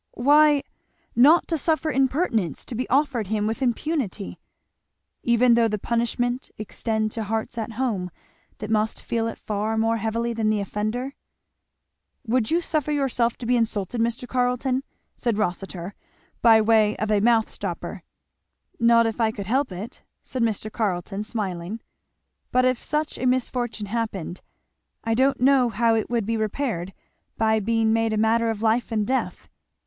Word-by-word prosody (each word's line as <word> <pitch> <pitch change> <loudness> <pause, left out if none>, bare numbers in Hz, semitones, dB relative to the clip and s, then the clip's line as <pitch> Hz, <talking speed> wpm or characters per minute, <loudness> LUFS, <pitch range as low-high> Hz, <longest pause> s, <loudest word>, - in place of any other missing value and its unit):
"Why, 290 +2 +5 0.5
not 295 +8 +6
to 325 -2 0
suffer 315 +1 0
impertinence 260 - 0
to - - -7
be 245 +2 -3
offered 265 -5 +1
him 210 0 0
with 225 +5 -2
impunity." 245 - -2 0.8
"Even 235 +1 +4
though 230 -1 +4
the 210 -1 -1
punishment 240 +3 -1
extend 215 0 -2
to 225 - -3
hearts 220 +3 -2
at 225 0 -4
home 215 -7 -1 0.5
that 215 0 -6
must 215 0 +1
feel 230 -1 -2
it 230 - -5
far 215 +1 -2
more 225 +1 +2
heavily 230 +2 -1
than 220 -1 0
the 215 -1 +1
offender?" 215 +7 -3 1.1
"Would 235 -1 +1
you 340 +2 +2
suffer 300 -3 -1
yourself 255 -5 0
to 240 - -7
be 250 +2 +2
insulted, 225 -1 -1
Mr. 235 +2 -1
Carleton?" 250 +1 0 0.3
said 235 -4 -1
Rossitur, 190 -2 -3 0.5
by 225 -1 +7
way 215 -1 +3
of 215 +2 -1
a 210 - +4
mouth 225 +1 +3
stopper. - - -5 0.8
"Not 230 0 +5
if 225 +1 -2
I 225 - +3
could 205 -2 -6
help 260 +3 0
it," 190 +6 -7 0.2
said 255 - -4
Mr. 215 -1 0
Carleton 195 -2 -2
smiling; 200 -2 -4 0.7
"but 255 0 +3
if 255 -1 +1
such 300 +1 -2
a 255 - 0
misfortune 245 -3 -1
happened, 200 -5 -4 0.6
I 225 - 0
don't 265 +4 +2
know 260 -1 +4
how 230 +1 +2
it 220 -1 0
would 235 -3 0
be 225 +1 -1
repaired 215 -4 -2 0.5
by 220 0 +2
being 225 +1 +1
made 225 -1 +1
a - - 0
matter 225 +1 +2
of 220 -1 -3
life 230 +2 +1
and 215 -2 0
death." 260 +4 -2
230 Hz, 160 wpm, -24 LUFS, 215-250 Hz, 1.1 s, by